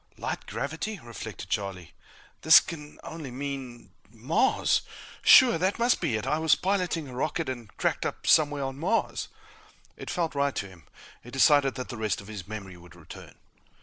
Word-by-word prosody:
Light - - -5
gravity! 160 - -4
reflected 120 -5 -9
Charlie. 95 -4 -3 0.5
This 160 +2 +9
can 150 -5 -9
only 160 -4 -7
mean 130 -2 -7 0.2
MARS! 130 - +1 0.4
Sure! 245 -9 +7
That 190 +3 0
must 240 +1 +2
be 115 - 0
it 110 - -3
I 150 +4 0
was 160 -1 +4
piloting 180 -5 -1
a 130 - -10
rocket 155 +5 -2
and 120 -5 -6
cracked - - 0
up - - -7
somewhere 145 -2 +4
on 135 0 -5
Mars. 190 +8 -1 0.7
It - - -9
felt 170 -3 -1
right 140 -1 0
to 100 - -3
him. 90 -3 -17 0.4
He 120 - -11
decided 135 +1 +4
that 125 - -6
the 120 - -6
rest 110 -1 -1
of 100 - -11
his 100 -3 -8
memory 100 -4 -8
would 85 0 -16
return. 80 -3 -12
135 Hz, 175 wpm, -27 LUFS, 110-160 Hz, 0.7 s, This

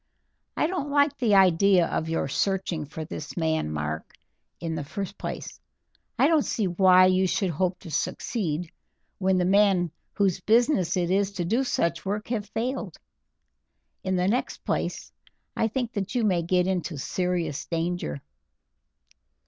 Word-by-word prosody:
"I - - +2
don't 320 -4 -2
like 285 0 +3
the 225 -5 +3
idea 190 -1 +5
of 160 0 -2
your 165 -3 0
searching 185 0 -1
for 155 +2 -6
this 155 0 -7
man, 160 - 0
Mark. 75 +1 -4 0.4
In 165 -1 -3
the 160 -2 -3
first 195 +7 -5
place, - - -6 0.6
I 275 - +5
don't 320 -1 +4
see 220 -5 -1
why 185 +1 +6
you 185 0 +3
should 185 0 0
hope 180 +3 0
to 165 - -9
succeed 175 -3 -2 0.5
when 190 -1 +2
the 180 - +2
men 190 -3 +3 0.2
whose 195 -3 +1
business 215 - +3
it 175 -1 0
is 195 +1 +2
to 180 -3 -2
do 230 +9 +1
such 170 -9 0
work 205 +3 -3
have 215 -4 -2
failed. 230 - -3 1.1
In 185 0 0
the 180 0 +1
next 240 +6 -1
place, - - -2 0.4
I 225 - +2
think 240 +1 -2
that 200 +3 -3
you 240 - +2
may 185 -5 +2
get 180 +1 +2
into 180 -4 -2
serious 170 -1 -2
danger." 165 - -2
185 Hz, 155 wpm, -26 LUFS, 170-210 Hz, 1.1 s, why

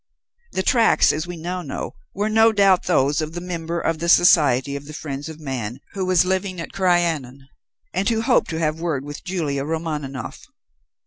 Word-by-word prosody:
The 190 - -1
tracks, 230 -1 +4
as 155 +3 -3
we 175 -1 -6
now 180 +3 -4
know, 145 - -5 0.2
were 205 +2 0
no 225 +1 +5
doubt 195 -3 +3
those 145 -4 +2
of 155 +1 -4
the 175 - -4
member 170 -1 -4
of 165 -1 -1
the 170 +1 -2
Society 140 -6 +5
of 140 0 -7
the 150 - -8
Friends 145 0 -5
of 160 -1 -9
Man 130 -5 -5
who 190 -2 -3
was 185 -1 +4
living 185 0 -1
at 165 - -6
Crianan, 165 -8 0 0.5
and 190 +5 0
who 225 -1 +1
hoped 245 +1 +2
to 160 - -3
have 155 -1 -1
word 155 -5 -2
with 145 0 -8
Julia 155 -7 -2
Romaninov. 150 -5 -4
165 Hz, 190 wpm, -22 LUFS, 145-185 Hz, 0.5 s, no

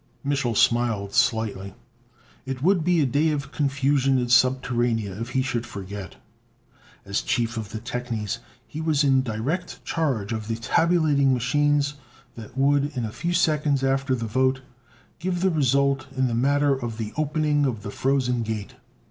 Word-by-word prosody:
Mich'l 140 -5 0
smiled 115 -4 +2
slightly. 100 -4 0 0.7
It 135 0 -4
would 180 -1 +3
be 175 -1 +3
a - - +3
day 145 +5 +2
of 140 -2 -3
confusion 135 -1 +1
in 125 -1 -1
Subterranea 120 -4 +2
if 115 - -4
he 130 - +3
should 125 -3 -2
forget. 100 -3 -8 0.9
As 100 0 -1
chief 120 -3 -1
of 110 -3 -5
the 110 - -5
technies 115 -2 -4 0.3
he 155 - -7
was 155 -2 +2
in 135 -2 +4
direct 130 +9 -4
charge 130 -11 -1
of 110 -1 -4
the 115 - -1
tabulating 145 +1 +2
machines 145 +3 +1 0.4
that 115 +2 -11
would, 140 +1 +2
a 115 -3 -2
few 175 +9 -3
seconds 150 -5 +2
after 135 0 +1
the 115 -2 -4
vote, 130 +3 +1 0.6
give 175 0 -2
the 190 0 +3
result 140 -2 +1
in 130 - +2
the 120 - -1
matter 140 +4 +2
of 120 -4 -4
the 110 -2 -5
opening 150 -1 +1
of 115 -5 -4
the 105 - -5
Frozen 130 -2 0
Gate. 110 +1 -4
130 Hz, 160 wpm, -24 LUFS, 115-145 Hz, 0.9 s, in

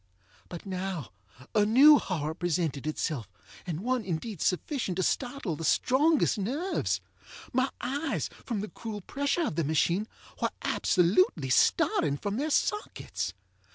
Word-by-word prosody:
But 175 +2 -8
now 185 - -4 0.4
a 210 - +4
new 275 +8 +8
horror 155 -5 -2
presented 160 -4 -1
itself, 150 - -2 0.4
and 170 -1 -3
one 250 +1 0
indeed 185 +1 -4
sufficient 195 - -1
to 185 - 0
startle 245 - -1
the 165 - -7
strongest 275 - +3
nerves. 285 - -1 0.5
My 260 +2 +2
eyes, 280 +4 -1 0.2
from 225 -5 -2
the 210 - -5
cruel 215 -3 -6
pressure 285 - -1
of 155 - -3
the 165 - +2
machine, 170 +7 +1 0.3
were - - +2
absolutely 175 -6 +2
starting 140 +2 +3
from 205 +7 -3
their 295 +4 -1
sockets. 420 +7 -1
200 Hz, 135 wpm, -29 LUFS, 165-260 Hz, 0.5 s, new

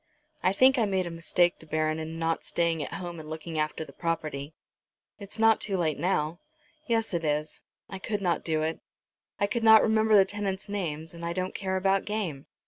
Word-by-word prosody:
I 185 - +3
think 260 +6 +5
I 225 - +3
made 190 -2 0
a 170 - -5
mistake, 175 +1 +1
De 160 - -14
Baron, 155 0 0
in 160 +1 -5
not 165 0 -1
staying 170 -2 0
at 145 - -5
home 175 -3 -6
and 155 -1 -9
looking 160 0 -5
after 155 +1 -1
the - - -14
property." 155 -3 -3 0.6
"It's 200 +1 -6
not 225 0 +4
too 195 -2 0
late, 160 -4 0
now." 170 -2 0 0.5
"Yes, 225 -4 0
it 170 -1 -1
is. 150 0 -1 0.3
I 190 - -7
could 210 +2 -2
not 180 -3 0
do 155 -1 0
it. 160 +1 -2 0.6
I 200 - +3
could 225 +3 -2
not 220 -1 +8
remember 220 0 +3
the 195 -2 +7
tenants' 195 -1 -3
names, 165 -6 -4
and 170 0 -10
I 170 0 -2
don't 185 +1 -3
care 190 -1 -2
about 195 +1 +2
game. 185 -10 -3
175 Hz, 210 wpm, -28 LUFS, 160-200 Hz, 0.6 s, not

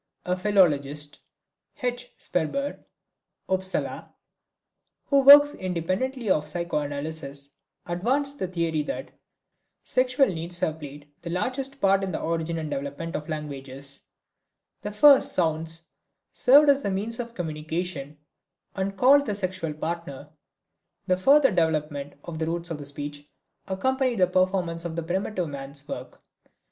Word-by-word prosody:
A 180 - +1
philologist, 150 -7 +1 0.6
H. 245 0 -2
Sperber 275 - -2 0.6
(Upsala) 190 0 -2 0.9
who 280 - +3
works 290 +2 +9
independently 185 +8 -2
of 150 -5 +2
psychoanalysis, 145 -3 -4 0.4
advanced 265 +11 -1
the 185 - -1
theory 170 -3 -1
that 150 - -5 0.7
sexual 255 +2 +3
needs 175 -2 -2
have 160 -2 -1
played 145 0 -10
the 170 - -6
largest 260 +9 -2
part 195 0 +3
in 190 - -2
the - - -3
origin 165 0 -2
and 155 -2 -4
development 145 +5 -4
of 150 +2 -5
languages. 140 -2 -7 0.8
The - - -4
first 275 +6 +6
sounds 165 -1 0 0.5
served 285 +3 +6
as 280 0 +4
means 200 +4 -2
of 235 -1 -5
communication, 155 -3 -4 0.6
and 195 0 -2
called 280 +5 +5
the 210 - -1
sexual 185 -5 -3
partner; 160 -3 -5 0.8
the 185 - +2
further 270 +7 +5
development 155 -5 -1
of 160 -2 -7
the 160 - -1
roots 170 +1 -3
of 150 -3 -5
speech 145 0 -7 0.4
accompanied 255 +5 0
the 185 - +5
performance 185 -2 0
of 170 -2 -5
the 170 - -2
primitive 180 0 -2
man's 140 +1 -8
work. 125 -3 -8
170 Hz, 130 wpm, -26 LUFS, 150-210 Hz, 0.9 s, works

